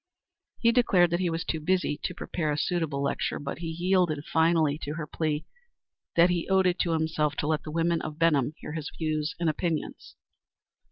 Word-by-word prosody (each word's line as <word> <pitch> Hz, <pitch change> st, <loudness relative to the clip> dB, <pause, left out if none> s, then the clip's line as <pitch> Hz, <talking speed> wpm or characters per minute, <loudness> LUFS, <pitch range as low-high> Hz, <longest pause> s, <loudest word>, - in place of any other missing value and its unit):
He 230 Hz, -1 st, +4 dB
declared 190 Hz, -8 st, +4 dB
that 170 Hz, -, +1 dB
he 180 Hz, -2 st, +1 dB
was 165 Hz, 0 st, -2 dB
too 160 Hz, -, -2 dB
busy 175 Hz, -2 st, 0 dB
to 180 Hz, -, -3 dB
prepare 155 Hz, -4 st, -2 dB
a 145 Hz, -, -1 dB
suitable 155 Hz, -4 st, -1 dB
lecture, 140 Hz, -, -1 dB
but 140 Hz, +2 st, -5 dB
he 170 Hz, -, -4 dB
yielded 170 Hz, -2 st, +1 dB
finally 160 Hz, -2 st, +2 dB
to 150 Hz, 0 st, -5 dB
her 160 Hz, -2 st, -4 dB
plea 150 Hz, 0 st, -2 dB, 0.7 s
that 170 Hz, +1 st, +6 dB
he 175 Hz, 0 st, -2 dB
owed 190 Hz, 0 st, +4 dB
it 180 Hz, 0 st, +2 dB
to 170 Hz, -, +1 dB
himself 155 Hz, -2 st, 0 dB
to 145 Hz, -, -2 dB
let 155 Hz, -1 st, +1 dB
the -, -, -8 dB
women 165 Hz, +1 st, +1 dB
of 155 Hz, -1 st, -6 dB
Benham 155 Hz, -3 st, +2 dB
hear -, -, -8 dB
his 155 Hz, -1 st, -4 dB
views 155 Hz, 0 st, -1 dB
and 170 Hz, -, 0 dB
opinions. 160 Hz, 0 st, -3 dB
160 Hz, 200 wpm, -27 LUFS, 150-175 Hz, 0.7 s, that